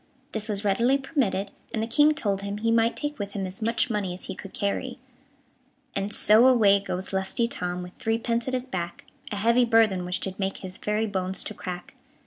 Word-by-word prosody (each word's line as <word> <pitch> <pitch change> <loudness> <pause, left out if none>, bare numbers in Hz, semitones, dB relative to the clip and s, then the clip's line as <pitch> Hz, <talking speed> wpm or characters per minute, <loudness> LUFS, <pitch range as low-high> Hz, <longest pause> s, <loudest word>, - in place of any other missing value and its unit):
This 220 0 -4
was 205 0 -2
readily 235 +7 +3
permitted, 255 -9 -1 0.2
and 220 - 0
the - - -2
King 295 +6 +4
told 200 -8 0
him 200 0 -4
he 230 +2 +1
might 230 0 +3
take 295 -2 -4
with 200 -1 -4
him 195 -2 -2
as 185 +3 -7
much 230 +2 +1
money 200 -4 -1
as 185 - -10
he - - -5
could 195 +1 -9
carry. 245 +5 -2 1.0
And 195 +1 -1
so 220 +4 +6
away 210 -6 +6
goes 190 -1 -4
lusty 190 +5 0
Tom, 180 -5 -3
With 180 0 -10
three 225 -3 +1
pence 235 +1 -1
at 260 - 0
his 250 0 -2
back 175 -8 -5 0.3
A - - -2
heavy 235 +4 +4
burthen 225 -6 +4
which 180 +1 -2
did 190 0 -4
make 195 0 -1
His 185 -1 -8
very 210 +1 0
bones 190 -2 -2
to - - -5
crack. 180 -3 -7
210 Hz, 215 wpm, -26 LUFS, 190-235 Hz, 1.0 s, so